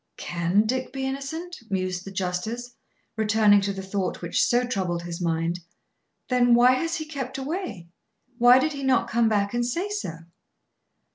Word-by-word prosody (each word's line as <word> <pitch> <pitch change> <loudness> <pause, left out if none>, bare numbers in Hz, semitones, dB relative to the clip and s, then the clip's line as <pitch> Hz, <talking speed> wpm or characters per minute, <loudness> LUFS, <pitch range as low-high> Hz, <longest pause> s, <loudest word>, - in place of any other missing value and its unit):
"Can 175 +5 +1
Dick 255 +3 -2
be 265 0 -3
innocent?" 280 +6 -5
mused 185 -2 -2
the 195 - -7
justice, 195 +7 -3 0.4
returning 215 -2 +4
to 200 0 -1
the 195 -1 -6
thought 190 0 -2
which 170 - +1
so 245 +1 +2
troubled 185 -8 -2
his 170 0 -6
mind. 165 +1 0 0.7
"Then 245 -1 +4
why 245 +1 +6
has 330 +6 0
he 315 - -4
kept 275 -4 -5
away? 275 - -4 0.5
Why 245 +1 +8
did 310 +4 +1
he 280 - -6
not 265 -1 +2
come 230 0 +3
back 200 -1 +1
and 240 0 +1
say 335 +12 -2
so?" 410 - -3
235 Hz, 165 wpm, -25 LUFS, 190-265 Hz, 0.7 s, Why